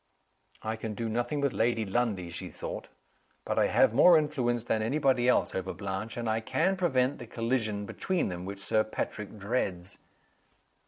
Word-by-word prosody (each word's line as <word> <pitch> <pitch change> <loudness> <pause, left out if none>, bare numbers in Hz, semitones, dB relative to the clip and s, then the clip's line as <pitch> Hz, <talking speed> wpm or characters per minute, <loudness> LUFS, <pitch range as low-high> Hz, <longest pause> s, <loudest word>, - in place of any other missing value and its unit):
"I 110 +1 -2
can 110 -1 -5
do 115 +2 -2
nothing 120 +6 -1
with 140 -2 +1
Lady 115 -1 +1
Lundie," 100 -4 -1
she - - -5
thought. - - -6 0.6
"But - - 0
I - - +4
have - - +4
more 165 +7 +7
influence 130 -6 0
than 110 -2 0
any 115 +7 0
body 130 -4 +3
else - - +2
over 95 0 -3
Blanche 100 +3 -4
and 120 -1 -3
I 110 0 +1
can 165 +11 +1
prevent 140 -7 +1
the 120 - -8
collision 115 -3 -1
between 185 - -1
them 90 -1 -5
which 100 +2 -6
Sir 110 +2 +2
Patrick 105 -1 -5
dreads." 100 -4 -2
115 Hz, 175 wpm, -29 LUFS, 105-130 Hz, 0.6 s, more